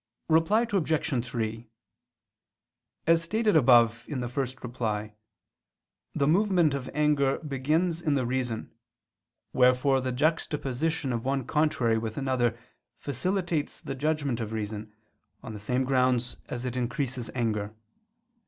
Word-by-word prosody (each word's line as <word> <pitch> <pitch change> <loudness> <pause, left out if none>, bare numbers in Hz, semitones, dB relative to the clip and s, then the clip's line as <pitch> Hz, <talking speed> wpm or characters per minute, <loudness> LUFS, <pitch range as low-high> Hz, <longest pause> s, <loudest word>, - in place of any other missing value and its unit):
Reply 165 +8 +4
Obj. 155 -8 +1
3: 115 -2 -4 1.4
As 165 0 +4
stated 215 +4 +1
above 120 -5 +5
(ad 125 -1 -4
1), 105 -3 -2 1.0
the 140 - +2
movement 175 -3 +3
of 135 -2 -4
anger 150 -2 +2
begins 155 +4 0
in 150 -4 +1
the 130 -3 0
reason, 120 -2 -2 0.8
wherefore 130 +1 +4
the 130 0 -2
juxtaposition 150 0 -1
of 115 -1 -2
one 135 -1 -1
contrary 130 -7 +1
with 110 -1 -5
another 125 -4 0 0.4
facilitates 170 - -2
the - - -5
judgment 140 -3 -1
of 110 -1 -4
reason, 105 0 -4 0.5
on 115 -4 -7
the 105 - -7
same 125 +5 0
grounds 125 -2 +1
as 125 0 -4
it 125 -1 -3
increases 125 0 -2
anger. 110 -3 -1
130 Hz, 120 wpm, -28 LUFS, 120-150 Hz, 1.4 s, above